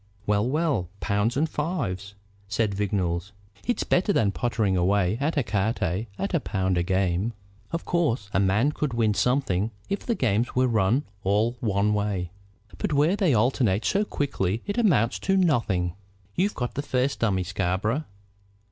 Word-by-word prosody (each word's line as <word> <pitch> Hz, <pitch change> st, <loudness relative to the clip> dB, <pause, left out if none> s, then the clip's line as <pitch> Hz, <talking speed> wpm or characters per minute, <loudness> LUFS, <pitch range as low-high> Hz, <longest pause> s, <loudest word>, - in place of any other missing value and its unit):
"Well, 105 Hz, +3 st, +2 dB
well; 145 Hz, -, 0 dB
pounds 105 Hz, +5 st, 0 dB
and 155 Hz, +3 st, +2 dB
fives," 115 Hz, -, -3 dB, 0.3 s
said 105 Hz, 0 st, 0 dB
Vignolles. 95 Hz, -2 st, -1 dB, 0.3 s
"It's 245 Hz, -, +1 dB
better 185 Hz, +3 st, +2 dB
than 105 Hz, -, +2 dB
pottering 110 Hz, -4 st, 0 dB
away 95 Hz, +3 st, +2 dB
at 155 Hz, +4 st, 0 dB
ecarte 110 Hz, -, 0 dB
at 195 Hz, -, -3 dB
a 170 Hz, -, +3 dB
pound 95 Hz, -7 st, 0 dB
a -, -, +2 dB
game. 95 Hz, +4 st, 0 dB, 0.4 s
Of 165 Hz, -, -3 dB
course 150 Hz, -, 0 dB
a -, -, +3 dB
man 100 Hz, +9 st, +3 dB
could 150 Hz, -4 st, -2 dB
win 110 Hz, -2 st, +2 dB
something 115 Hz, -5 st, +1 dB, 0.2 s
if 200 Hz, -, 0 dB
the 235 Hz, -, -2 dB
games 115 Hz, -, 0 dB
were 130 Hz, -, +3 dB
to -, -, +1 dB
run 115 Hz, +5 st, +2 dB, 0.2 s
all 105 Hz, +5 st, +2 dB
one 105 Hz, -1 st, +1 dB
way; 100 Hz, -4 st, -1 dB, 0.5 s
but -, -, -1 dB
where 150 Hz, +6 st, +3 dB
they 185 Hz, -10 st, +2 dB
alternate 115 Hz, -3 st, +2 dB
so 205 Hz, -, +2 dB
quickly 115 Hz, -, -2 dB
it 205 Hz, +3 st, -2 dB
amounts 140 Hz, -, +3 dB
to 195 Hz, 0 st, +1 dB
nothing. 115 Hz, -, +1 dB, 0.4 s
You've 200 Hz, -, 0 dB
got 125 Hz, -2 st, -3 dB
the 140 Hz, -, -2 dB
first 130 Hz, -1 st, 0 dB
dummy, 95 Hz, -5 st, +1 dB
Scarborough. 95 Hz, -, -1 dB
110 Hz, 165 wpm, -26 LUFS, 95-145 Hz, 0.5 s, a